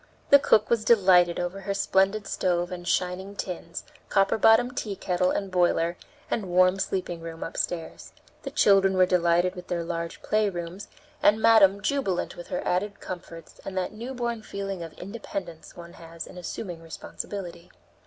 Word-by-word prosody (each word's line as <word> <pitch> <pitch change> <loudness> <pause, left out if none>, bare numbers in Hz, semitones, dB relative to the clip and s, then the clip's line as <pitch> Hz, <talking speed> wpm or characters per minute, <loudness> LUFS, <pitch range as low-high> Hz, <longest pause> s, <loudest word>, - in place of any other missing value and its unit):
The 280 - +9
cook 215 -5 +3
was 230 -2 +2
delighted 185 -6 +5
over 180 +2 -3
her 195 +1 -3
splendid 195 +1 +2
stove 175 -1 -1
and 175 -1 -7
shining 185 +2 -1
tins, 175 -3 -6 0.3
copper 195 +2 +2
bottomed 245 +4 +5
tea 205 -3 -3
kettle 180 -1 0
and 195 0 -2
boiler, 175 -1 +2 0.4
and 200 -5 -2
warm 185 +2 +4
sleeping 180 -3 -3
room 165 0 -7
upstairs; 165 0 -4 0.3
the - - -5
children 195 -2 +4
were 185 - +6
delighted 175 0 +2
with 180 -2 -10
their 170 -1 -2
large 170 0 -5
playrooms, 195 -3 -1 0.3
and 205 +2 +4
madam 200 -3 +5
jubilant 265 -10 -1
with 175 - -9
her 180 - -3
added 200 +3 -1
comforts 170 -3 -9
and 190 - -6
that 185 +2 -2
newborn 235 0 -4
feeling 195 -3 -5
of 165 -2 -7
independence 190 -4 -7
one 170 0 -10
has 165 0 -9
in - - -13
assuming 180 -1 -6
responsibility. 170 +2 -7
185 Hz, 160 wpm, -26 LUFS, 175-200 Hz, 0.4 s, The